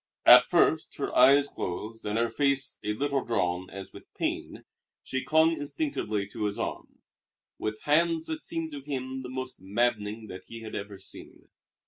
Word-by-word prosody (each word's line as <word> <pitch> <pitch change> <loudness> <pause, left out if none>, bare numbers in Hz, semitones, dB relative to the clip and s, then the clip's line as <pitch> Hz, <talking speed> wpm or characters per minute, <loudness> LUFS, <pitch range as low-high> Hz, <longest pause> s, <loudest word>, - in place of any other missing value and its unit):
At - - +9
first, - - +3
her - - -3
eyes 140 +3 +7
closed 110 +1 -5
and 105 +1 0
her 115 +1 +2
face 140 +1 0
a 105 0 0
little 140 +3 0
drawn 95 -5 -1
as 95 0 -9
with - - -13
pain, - - -3 0.4
she 130 0 -3
clung 160 +1 +4
instinctively 145 - -2
to 105 - -3
his 105 -1 -2
arm, - - -5 0.6
with 110 0 -3
hands 160 +2 +2
that 160 -1 -3
seemed 165 -1 -4
to 145 -1 -6
him 130 -2 -4
the 125 - -7
most 130 -4 -5
maddening 110 +1 -1
that 95 -3 -9
he 115 0 -8
had 110 -1 -8
ever 100 -1 -5
seen. 95 - -10
120 Hz, 170 wpm, -28 LUFS, 105-145 Hz, 0.6 s, At